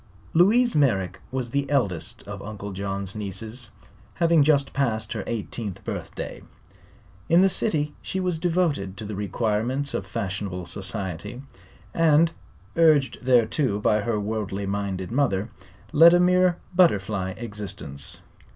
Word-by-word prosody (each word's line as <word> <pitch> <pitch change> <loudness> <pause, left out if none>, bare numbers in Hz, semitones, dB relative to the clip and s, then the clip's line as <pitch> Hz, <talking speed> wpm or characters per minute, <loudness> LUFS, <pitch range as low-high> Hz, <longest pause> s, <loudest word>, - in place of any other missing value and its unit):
Louise 230 +8 +5
Merrick 95 - +1
was 130 -3 -3
the 140 0 -1
eldest 95 - -1
of 100 -1 -6
Uncle 100 -1 -7
John's 100 0 -4
nieces, 110 +3 -6 0.5
having 170 -2 +4
just 140 -1 +3
passed 110 -5 -1
her - - -4
eighteenth 110 -3 -4
birthday. - - -6 0.9
In 170 +3 +6
the - - +6
city 155 -7 +1
she 190 - -3
was 180 -3 -1
devoted 160 - 0
to 105 - -6
the 105 - -5
requirements 110 +7 -1
of - - -3
fashionable 95 -1 -4
society 100 +4 -4 0.5
and 165 0 +4 0.4
urged 155 -5 +4
thereto 125 -1 +2
by 105 0 +2
her 105 0 -1
worldly 100 -2 -3
minded 100 -1 -3
mother 115 -6 +1 0.4
led 165 +3 +8
a - - +4
mere 180 0 +4 0.2
butterfly 100 - +2
existence. 100 -10 -7
110 Hz, 130 wpm, -25 LUFS, 100-150 Hz, 0.9 s, led